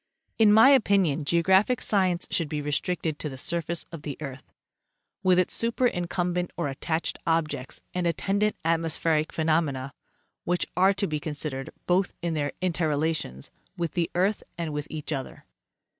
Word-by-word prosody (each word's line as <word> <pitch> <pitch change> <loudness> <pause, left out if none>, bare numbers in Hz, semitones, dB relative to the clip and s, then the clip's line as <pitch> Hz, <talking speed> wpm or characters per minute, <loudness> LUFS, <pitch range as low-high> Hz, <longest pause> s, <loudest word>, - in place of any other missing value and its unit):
In 215 -2 +7
my 220 +5 +8
opinion, 195 - +3
geographic 190 - +3
science 185 -4 +2
should 165 -4 0
be 150 - -2
restricted 150 +2 -1
to 150 - -3
the 135 - -8
surface 170 +3 -1
of 165 -3 -8
the 145 -2 -6
earth, 135 -3 -8 0.7
with 185 -2 +4
its 185 - +2
superincumbent 180 -7 0
or 145 - -1
attached 160 +4 -2
objects 155 -5 -1
and 180 -1 0
attendant 200 +5 0
atmospheric 165 -1 +1
phenomena, 155 -4 0 0.5
which 175 0 0
are 190 +2 +5
to 200 +1 -1
be 155 -4 -2
consid 150 0 -3
ered, 135 0 -5 0.2
both 180 +1 +1
in 170 -1 0
their 145 -2 -1
interrelations 155 - -1 0.3
with 170 -3 -2
the 170 -2 0
earth 195 +4 +1 0.2
and 165 -3 -3
with 150 +1 -4
each 155 0 -4
other. 135 -2 -6
165 Hz, 155 wpm, -26 LUFS, 150-180 Hz, 0.7 s, my